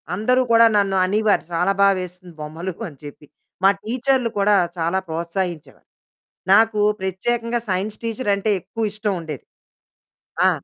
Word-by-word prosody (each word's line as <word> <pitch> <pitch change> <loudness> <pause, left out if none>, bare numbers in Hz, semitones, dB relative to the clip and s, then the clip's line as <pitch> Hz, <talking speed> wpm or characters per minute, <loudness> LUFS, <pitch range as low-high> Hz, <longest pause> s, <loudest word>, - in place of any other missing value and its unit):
అందరూ 250 +6 +2
కూడా 230 0 +7
నన్ను 195 -1 +1
అనేవారు, 210 +2 +2
చాలా 180 +3 +2
బా 200 - +7
వేస్తుంది 180 0 -9
బొమ్మలు 165 +4 -5
అని 145 -5 -12
చెప్పి. 145 0 -11 0.4
మా 195 - +7
టీచర్లు 250 +1 0
కూడా 205 +1 +4 0.2
చాలా 170 +3 0
ప్రోత్సాహించేవారు. 170 0 -4 0.6
నాకూ 215 +1 +5 0.2
ప్రత్యేకంగా 230 +5 -1
సైన్స్ 195 +3 -2
టీచరంటే 220 -3 0
ఎక్కువు 225 +5 -4
ఇష్టముండేది. 180 - -4 1.0
ఆ! - - +6
195 Hz, 125 wpm, -21 LUFS, 175-225 Hz, 1.0 s, కూడా